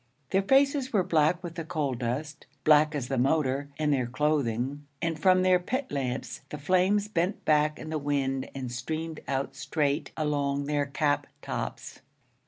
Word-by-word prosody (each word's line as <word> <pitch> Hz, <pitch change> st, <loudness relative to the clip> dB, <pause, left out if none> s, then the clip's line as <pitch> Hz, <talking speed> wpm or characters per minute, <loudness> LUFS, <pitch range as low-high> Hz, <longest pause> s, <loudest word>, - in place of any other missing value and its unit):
Their 195 Hz, -, +3 dB
faces 270 Hz, +4 st, +3 dB
were 200 Hz, -5 st, +3 dB
black 170 Hz, 0 st, +2 dB
with 170 Hz, -2 st, -5 dB
the 170 Hz, -1 st, -5 dB
coal 150 Hz, -4 st, -1 dB
dust, 130 Hz, +5 st, -4 dB, 0.2 s
black 150 Hz, 0 st, +5 dB
as 135 Hz, -4 st, -2 dB
the 135 Hz, -1 st, -1 dB
motor 140 Hz, +1 st, +1 dB
and 150 Hz, -1 st, +2 dB
their 130 Hz, -3 st, 0 dB
clothing, 140 Hz, 0 st, -1 dB
and 165 Hz, -2 st, -2 dB
from 185 Hz, -1 st, +5 dB
their 185 Hz, -1 st, +5 dB
pit 255 Hz, +9 st, -3 dB
lamps 130 Hz, -3 st, -3 dB
the 150 Hz, -, -5 dB
flames 185 Hz, +7 st, +2 dB
bent 185 Hz, -1 st, -1 dB
back 150 Hz, 0 st, +3 dB
in 155 Hz, -, -7 dB
the 155 Hz, -, -1 dB
wind 135 Hz, -2 st, -1 dB
and 130 Hz, -3 st, -4 dB
streamed 155 Hz, +6 st, -4 dB
out 135 Hz, 0 st, -2 dB
straight 140 Hz, +2 st, -1 dB
along 145 Hz, -2 st, 0 dB
their 145 Hz, -1 st, 0 dB
cap 145 Hz, +1 st, 0 dB, 0.2 s
tops. -, -, -5 dB
150 Hz, 170 wpm, -28 LUFS, 140-170 Hz, 0.2 s, black